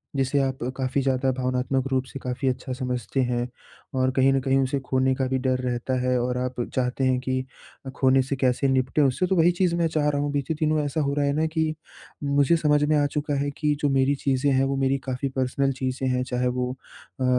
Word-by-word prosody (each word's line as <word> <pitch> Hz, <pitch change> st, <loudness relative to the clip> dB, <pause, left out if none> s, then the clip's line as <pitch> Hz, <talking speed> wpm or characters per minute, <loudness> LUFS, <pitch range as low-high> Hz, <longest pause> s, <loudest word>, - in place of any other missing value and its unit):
जिसे 135 Hz, +1 st, +1 dB
आप 135 Hz, -1 st, 0 dB, 0.2 s
काफ़ी 130 Hz, +1 st, -1 dB
ज़्यादा 135 Hz, 0 st, +1 dB
भावनात्मक 130 Hz, +1 st, 0 dB
रूप 130 Hz, -1 st, +1 dB
से 135 Hz, -, -8 dB
काफ़ी 125 Hz, +2 st, -2 dB
अच्छा 130 Hz, 0 st, -4 dB
समझते 125 Hz, 0 st, -2 dB
हैं। 120 Hz, -1 st, -1 dB, 0.5 s
और 130 Hz, 0 st, +2 dB
कहीं 130 Hz, +1 st, +3 dB
न 135 Hz, -, +2 dB
कहीं 135 Hz, 0 st, +2 dB
उसे 135 Hz, +1 st, 0 dB
खोने 130 Hz, +1 st, +2 dB
का 130 Hz, -, -1 dB
भी 130 Hz, 0 st, 0 dB
डर 130 Hz, 0 st, +1 dB
रहता 125 Hz, 0 st, -2 dB
है 125 Hz, 0 st, +1 dB
और 125 Hz, +1 st, -1 dB
आप 125 Hz, 0 st, -2 dB, 0.2 s
चाहते 125 Hz, +1 st, 0 dB
हैं 130 Hz, -1 st, +2 dB
कि 130 Hz, 0 st, -2 dB, 0.5 s
खोने 130 Hz, -1 st, +4 dB
से 135 Hz, +2 st, -2 dB
कैसे 130 Hz, +1 st, +1 dB
निपटे 130 Hz, +2 st, +1 dB
उससे 140 Hz, +6 st, +2 dB
तो 190 Hz, -, +1 dB
वही 170 Hz, 0 st, +5 dB
चीज़ 175 Hz, -1 st, +1 dB
मैं 170 Hz, -1 st, +2 dB
चाह 155 Hz, -2 st, 0 dB
रहा 145 Hz, -1 st, 0 dB
हूँ। 145 Hz, 0 st, -1 dB
बीते 145 Hz, +2 st, -1 dB
दिनों 155 Hz, -1 st, +2 dB
ऐसा 150 Hz, +2 st, -1 dB
हो 140 Hz, -1 st, 0 dB
रहा 145 Hz, 0 st, +1 dB
है 140 Hz, -, +1 dB
ना 155 Hz, +2 st, +1 dB
कि 160 Hz, -1 st, +1 dB, 0.5 s
मुझे 140 Hz, +2 st, +3 dB
समझ 150 Hz, -2 st, +2 dB
में 150 Hz, +1 st, +2 dB
आ 145 Hz, -, +3 dB
चुका 145 Hz, +1 st, -2 dB
है 145 Hz, +1 st, 0 dB
कि 150 Hz, -1 st, +1 dB
जो 145 Hz, -, +2 dB
मेरी 135 Hz, +1 st, +2 dB
चीज़ें 135 Hz, +1 st, +2 dB
हैं 130 Hz, 0 st, +3 dB
वो 135 Hz, 0 st, -1 dB
मेरी 135 Hz, 0 st, +1 dB
काफ़ी 130 Hz, +1 st, -3 dB
पर्सनल 130 Hz, +1 st, +1 dB
चीज़ें 130 Hz, 0 st, -2 dB
हैं। 125 Hz, 0 st, 0 dB
चाहे 125 Hz, 0 st, -1 dB
वो 125 Hz, 0 st, -1 dB
अ, 130 Hz, 0 st, -11 dB
135 Hz, 230 wpm, -25 LUFS, 130-145 Hz, 0.5 s, वही